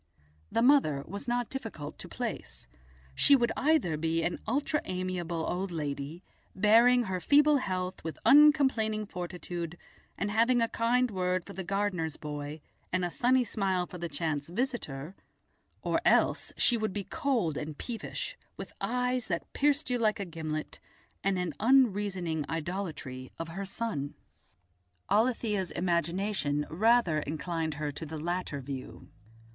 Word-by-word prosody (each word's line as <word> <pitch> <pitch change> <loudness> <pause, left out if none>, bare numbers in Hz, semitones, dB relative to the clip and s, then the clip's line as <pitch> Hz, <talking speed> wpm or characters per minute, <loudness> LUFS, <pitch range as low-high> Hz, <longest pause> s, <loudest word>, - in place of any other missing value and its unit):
The 230 - +2
mother 245 - +4
was 200 - -6
not 240 -1 0
difficult 225 - -6
to - - -8
place; - - -5 0.5
she 280 - +6
would 240 -3 +2
either 280 - +2
be 165 +1 0
an 175 +1 -1
ultra 290 +5 0
amiable 180 -3 -2
old 185 +1 -2
lady, 150 +1 -4 0.3
bearing 230 +5 +6
her 190 -4 -2
feeble 290 - +5
health 185 -6 -3
with 160 0 -5
uncomplaining 265 -8 +5
fortitude, 175 -2 -5 0.4
and 205 - -1
having 235 +3 +4
a 230 - +3
kind 240 +2 +1
word 185 -2 0
for - - -9
the 190 - -5
gardener's 185 -5 -1
boy 150 0 -6 0.3
and 185 0 +1
a 175 - -3
sunny 255 +5 +3
smile 195 -5 0
for 180 - -9
the 170 0 -3
chance 150 -1 -2
visitor, 180 - -3 0.7
or - - +1
else - - +3
she 240 - +4
would 215 -3 -2
be 205 - -3
cold 225 - 0
and 150 0 -5
peevish, 235 -3 -4 0.2
with - - -8
eyes 250 0 0
that 170 -2 -3
pierced 290 -1 +1
you 245 - +1
like 215 -2 +2
a 200 - -2
gimlet, 155 -2 -5 0.4
and 195 -1 +2
an 180 -3 -2
unreasoning 200 - +2
idolatry 160 -6 -4
of 165 0 -5
her 195 +4 -5
son. 190 -9 -3 1.0
Alethia's 210 -3 +2
imagination 170 -3 0
rather 215 -3 +3
inclined 160 +1 -3
her 150 0 -2
to 155 +3 -7
the 160 +1 -5
latter 170 -2 -3
view. 130 -1 -7
185 Hz, 145 wpm, -30 LUFS, 160-230 Hz, 1.0 s, she